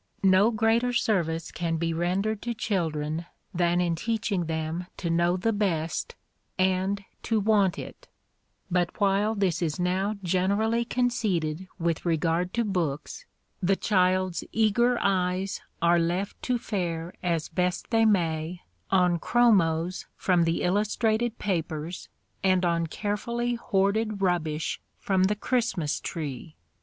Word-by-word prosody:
No 190 +3 +5
greater 230 +2 +2
service 170 -8 0
can 165 -1 -2
be 165 0 -1
rendered 195 +6 0
to 235 -1 -3
children 165 -5 -2 0.3
than 175 0 +2
in 175 -1 +1
teaching 215 -1 -1
them 160 +2 -3
to 170 -3 -2
know 170 +2 +2
the 225 +5 0
best 170 -6 -1 0.4
and 190 +2 +1 0.2
to 225 -2 +1
want 200 -3 +3
it; - - -9 0.6
but 175 +1 0
while 205 +2 +2
this 190 -4 0
is 160 -1 -1
now 190 +4 0
generally 200 +6 +1
conceded 200 -10 -1
with 170 -2 -1
regard 170 +1 0
to 235 -1 +1
books, 180 - -3 0.3
the 195 +1 +3
child's 185 -3 +1
eager 235 +3 +3
eyes 190 0 0 0.2
are 170 0 +5
left 175 +4 -1
to 250 -1 0
fare 175 -6 -3
as 170 -3 0
best 180 +4 -2
they 225 -1 +4
may 170 -4 +1 0.3
on 180 -2 +3
chromos 180 -7 +2
from 175 -3 +2
the 165 0 0
illustrated 215 +4 +1
papers 165 -3 -3 0.3
and 185 -1 +3
on 170 -1 +1
carefully 235 +6 -2
hoarded 215 -1 0
rubbish 165 -5 -1 0.2
from 190 -1 +2
the 210 +2 +1
Christmas 210 - 0
tree. 155 -2 -6
185 Hz, 130 wpm, -27 LUFS, 170-210 Hz, 0.6 s, No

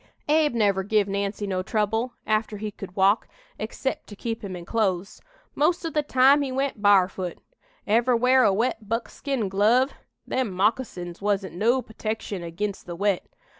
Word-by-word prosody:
"Abe 300 -3 +3
never 200 -4 +2
give 205 +1 +1
Nancy 200 +1 -2
no 185 -2 -1
trouble 225 +4 -1
after 215 0 0
he 210 +1 -4
could 195 -2 -10
walk 195 +3 +3 0.3
excep' 230 +5 -3
to 205 - -10
keep 225 +2 -4
him 190 -2 -5
in 175 -1 -8
clothes. 195 -3 -1 0.3
Most 340 +4 +1
o' 325 - -2
the 300 - +1
time 275 0 +5
he 275 -2 -2
went 270 -4 -2
bar'foot. 190 -3 +3 0.5
Ever 235 +4 +3
wear 255 +2 +4
a 210 - +5
wet 220 0 -1
buckskin 230 +1 -2
glove? 220 +8 +3 0.3
Them 255 -5 -1
moccasins 185 -3 -1
wasn't 195 -4 -1
no 235 +8 +2
putection 215 -3 -4
ag'inst 190 +4 -4
the 175 - -5
wet. 200 0 0
215 Hz, 165 wpm, -25 LUFS, 195-245 Hz, 0.5 s, time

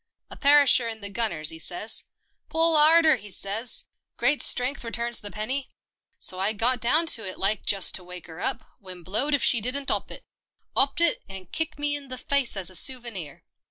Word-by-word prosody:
A - - -9
perisher 280 -4 +4
in 225 -1 -8
the 200 0 -5
gunners, 195 -9 -1
'e 160 - -10
says, 180 +7 0 0.2
' - - -43
Pull 325 0 +3
'arder,' 315 +1 +6
'e 205 - -11
says, 205 +5 0 0.2
' - - -57
Great 295 - +2
strength 250 +2 +2
returns 235 0 -2
the 205 - -7
penny.' 255 +8 -4 0.5
So 185 - -1
I 200 +3 0
got 245 +4 0
down 310 +8 +3
to 225 - -2
it 185 -1 -6
like, 195 +1 -2
just 195 -2 +4
to 185 - -2
wake 180 0 -11
'er 165 0 -12
up, 260 -3 -3
when 185 -4 -12
blowed 235 - 0
if 280 - -2
she 235 - +4
didn't 270 +5 -1
'op - - -3
it. - - -11 0.5
'Opped 280 +4 +1
it, 340 -2 +3
and 190 -2 -10
kicked 320 -1 -2
me 290 0 -1
in 285 -1 -7
the 255 0 -6
faice 270 -4 0
as 190 -1 -4
a - - -7
souvenir." 225 - 0
235 Hz, 210 wpm, -24 LUFS, 195-280 Hz, 0.5 s, arder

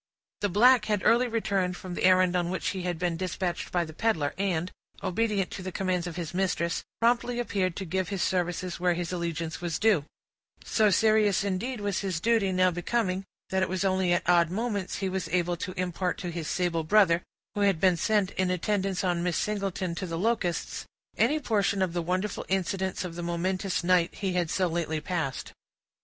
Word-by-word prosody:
The 205 - 0
black 230 +4 +5
had 210 -3 0
early 245 +2 +5
returned 195 -6 -1
from 185 -1 -7
the 175 - 0
errand 185 -1 +5
on 175 -1 +1
which 185 - -1
he 190 - -3
had 175 -1 -2
been 175 -1 -1
dispatched 185 0 -3
by 175 -1 +1
the 160 - -10
peddler, 160 -7 0
and, 185 -3 -1 0.3
obedient 205 -1 0
to - - -6
the 185 0 -5
commands 180 -1 -1
of 170 - -6
his 170 -2 -5
mistress, 180 -2 0 0.2
promptly 240 +1 +2
appeared 195 -7 -1
to 195 - -4
give 185 +1 -2
his 195 -3 -1
services 180 0 -1
where 180 -1 +2
his 175 0 -3
allegiance 170 -2 -3
was 170 -2 -2
due; 210 -9 +3 0.6
so 215 -2 +3
serious, 215 -1 +3
indeed, 205 +5 -2
was 205 -1 -1
his 185 -5 -2
duty 220 -1 +2
now 185 0 +3
becoming, 185 +2 -1 0.3
that 190 0 +1
it 185 - +1
was 185 +1 -1
only 190 -2 +2
at 175 - +1
odd 170 -2 +4
moments 205 -1 -2
he 195 - -2
was 185 -2 -2
enabled 175 0 0
to 185 -1 -5
impart 180 0 -1
to 175 -2 -4
his 165 -2 -4
sable 175 -3 0
brother, 175 -1 +4 0.3
who 205 - -2
had 195 -5 +3
been 185 0 +4
sent 205 +2 +1
in 185 -1 0
attendance 190 +1 0
on 175 -2 +1
Miss 175 -2 0
Singleton 195 -4 -2
to 185 +2 -4
the 165 -1 -3
Locusts, 180 -4 -1 0.3
any 295 +7 +2
portion 205 -7 +1
of 180 -3 -2
the 175 - -1
wonderful 185 +4 -2
incidents 190 0 -1
of 175 - -6
the 175 - -6
momentous 180 +2 -1
night 175 -1 +2
he 195 -3 -2
had 175 -2 0
so 185 +2 +1
lately 165 -2 -1
passed. 155 -4 -3
185 Hz, 200 wpm, -28 LUFS, 175-200 Hz, 0.6 s, black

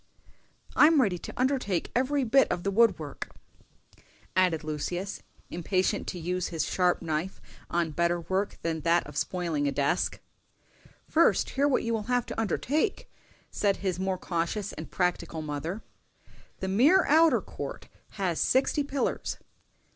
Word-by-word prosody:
"I'm 310 0 +6
ready 195 -9 +2
to - - -8
undertake 255 -9 0
every 265 +3 +1
bit 265 +3 +4
of 175 0 -2
the 200 - 0
wood 225 -2 +4
work," 145 -3 -7 1.1
added 180 -4 +2
Lucius, 175 +5 -4 0.3
impatient 185 +4 0
to 185 - -4
use 180 +2 -2
his 165 -2 -2
sharp 180 -1 +1
knife 160 +3 -2 0.3
on 170 -2 0
better 170 +2 +1
work 190 +4 -2
than 160 -1 -1
that 170 +2 +2
of - - -11
spoiling 165 -5 -1
a - - +1
desk. 140 +5 0 0.9
"First 330 +1 +3
hear 280 +1 +2
what 275 - +2
you 230 0 -1
will 215 -1 -2
have 245 -1 +2
to - - -3
undertake," 300 - -1 0.4
said 200 -2 +1
his 185 -3 -2
more 190 0 -1
cautious 180 +4 -2
and - - -8
practical 170 -3 -1
mother. 155 +8 -4 0.8
"The 190 - -2
mere 280 - +5
outer 320 +2 +5
court - - -7 0.3
has 185 -5 -1
sixty 270 +3 +2
pillars." 280 -1 -2
185 Hz, 145 wpm, -28 LUFS, 170-235 Hz, 1.1 s, I'm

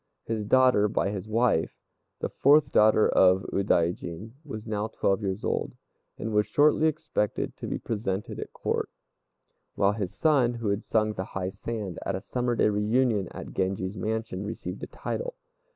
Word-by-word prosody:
His 110 -1 -2
daughter 125 -3 +4
by 100 -1 0
his 105 +1 -5
wife, 115 -6 +1 0.4
the - - -1
fourth 145 0 +4
daughter 110 0 +5
of 95 0 +4
Udaijin, 90 +1 0
was 110 -8 -7
now 105 -1 -2
twelve 100 -2 0
years 95 +1 -3
old, - - -1 0.4
and 110 - -4
was 105 0 +3
shortly 150 +2 +4
expected 155 -9 -2
to - - -6
be - - -2
presented 105 -3 -3
at - - -6
Court; - - -2 0.9
while 100 +1 +3
his 100 -4 -4
son, 135 -7 +3
who 115 -3 -2
had 100 +1 -1
sung 110 -1 +1
the 95 - -3
"high 95 0 -2
sand" 105 -4 -5
at - - -2
a 95 - -4
summer 120 +2 -1
day 110 - +3
reunion 105 -1 +1
at - - -9
Genji's 95 +1 -1
mansion, 110 -3 -3
received 105 - -6
a - - -5
title. - - -4
105 Hz, 170 wpm, -27 LUFS, 100-120 Hz, 0.9 s, daughter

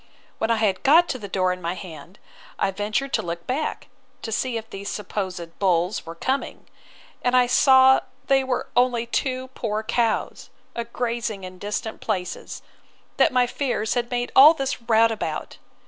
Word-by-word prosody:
When 220 - 0
I 230 - +3
had 210 -4 0
got 330 +5 +5
the 235 -6 -4
door 185 -1 +1
in 180 - -9
my 170 +1 -2
hand, 175 0 -10 0.4
I 195 - +1
ventured 210 +7 -2
to - - +2
look 170 0 -6
back, 280 +5 -3 0.4
to 225 - -4
see 240 +2 -1
if 225 0 -7
these 200 -1 -7
supposed 185 -4 -5
bulls 180 -1 +1
were 165 - -7
coming; 260 +10 -3 0.6
and 250 0 +2
I 250 - +5
saw 260 +1 +6 0.3
they 270 -1 +3
were 260 -1 -2
only 245 -1 +2
two 255 +2 -2
poor 220 -4 -3
cows, 230 0 -1 0.2
a 235 - -4
grazing 235 -4 -3
in 185 0 -9
distant 210 +2 -4
places, 185 -5 -4 0.5
that - - +4
my 250 -1 +3
fears 240 -4 -1
had 240 -1 -1
made 245 0 -2
all 300 +5 +9
this 270 -3 -3
rout 230 -1 +4
about. 165 -8 -4
225 Hz, 170 wpm, -23 LUFS, 195-255 Hz, 0.6 s, all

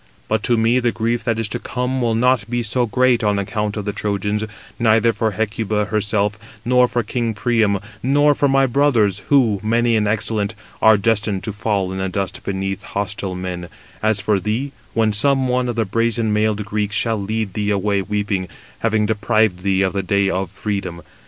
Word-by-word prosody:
But 110 -1 0
to 120 - +2
me 115 +3 +3
the 120 -1 +1
grief 115 +1 -1
that 115 -2 0
is 115 -1 -1
to - - -3
come 125 +1 -2
will 115 -2 +1
not 125 +1 +2
be 120 0 -1
so 120 +2 0
great 125 +2 +2
on 105 -1 +2
account 105 +2 -2
of 105 - -4
the 105 - -2
Trojans, 105 +1 -1 0.4
neither 115 0 +4
for 110 +1 0
Hecuba 105 0 -1
herself, 105 0 0 0.3
nor 125 +1 +4
for 120 -1 -1
king 115 -3 -2
Priam, 110 -2 +2 0.2
nor 145 +4 +4
for 145 - +1
my 135 0 +4
brothers, 120 -7 +2
who, 120 -8 +4
many 115 +2 +2
and 105 -1 +1
excellent, 105 -1 -1 0.3
are 110 -1 +6
destined 105 -2 0
to 110 - -4
fall 100 -3 -1
in 95 - -4
the 95 0 -1
dust 95 0 -3
beneath 95 0 -3
hostile 100 -1 -4
men, 90 -1 -5 0.3
as 110 -1 +1
for 105 0 +1
thee, 110 +9 -2 0.2
when 110 -2 +2
some 135 +5 +2
one 125 0 0
of 120 - -2
the 115 -1 0
brazen 115 +1 0
mailed 105 -1 0
Greeks 105 0 -2
shall 115 -3 0
lead 105 -1 -2
thee 105 -1 -1
away 100 0 +1
weeping, 100 -2 -2 0.3
having 110 -2 +1
deprived 110 -2 +1
thee 95 0 +1
of 95 - 0
the 100 - 0
day 100 +1 +1
of 95 -1 -2
freedom. 95 -4 -4
110 Hz, 195 wpm, -20 LUFS, 100-115 Hz, 0.4 s, are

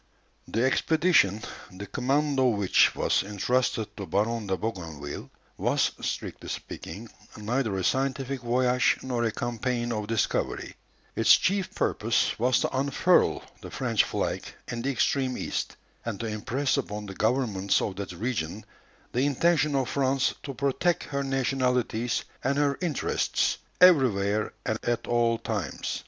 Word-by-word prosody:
The 115 - 0
expedition, 135 - +3 0.3
the 95 +2 -8
command 140 +7 0
of 125 -4 +3
which 100 -3 +4
was - - +2
entrusted 110 +2 -1
to 100 -3 -5
Baron 105 +5 0
de 95 -1 0
Bougainville, 80 -10 -5 0.3
was, - - +1
strictly - - -4
speaking, - - -7 0.3
neither 110 -1 -1
a 95 - -2
scientific 135 +2 0
voyage 125 +1 +2
nor 125 -2 -1
a 115 - +1
campaign 120 +1 -2
of 105 -2 -2
discovery. 115 -2 -1 0.4
Its - - +6
chief 195 -1 0
purpose 110 +1 +1
was 125 +1 +3
to - - -1
unfurl 135 +1 +3 0.2
the - - -8
French - - +1
flag - - -2 0.2
in 120 -1 -4
the 135 - -1
extreme 130 -1 +1
East, - - -3 0.3
and 115 -4 -4
to 115 - -3
impress 120 +6 -1
upon 105 -6 -3
the 100 - -7
governments 110 -3 +1
of 100 - -2
that 100 -2 -5
region 100 -1 -3 0.5
the 130 +4 +1
intention 150 +1 +2
of 135 -2 +1
France 135 +1 +1
to 140 -2 -6
protect 140 +6 +1
her 140 -2 -3
nationalities 125 -3 0 0.2
and 140 +2 +1
her 145 -1 +2
interests, 165 -6 0 0.2
everywhere 110 - +4
and 110 0 -1
at 120 -1 -1
all 120 -1 +2
times. - - -3
120 Hz, 145 wpm, -27 LUFS, 105-135 Hz, 0.5 s, Its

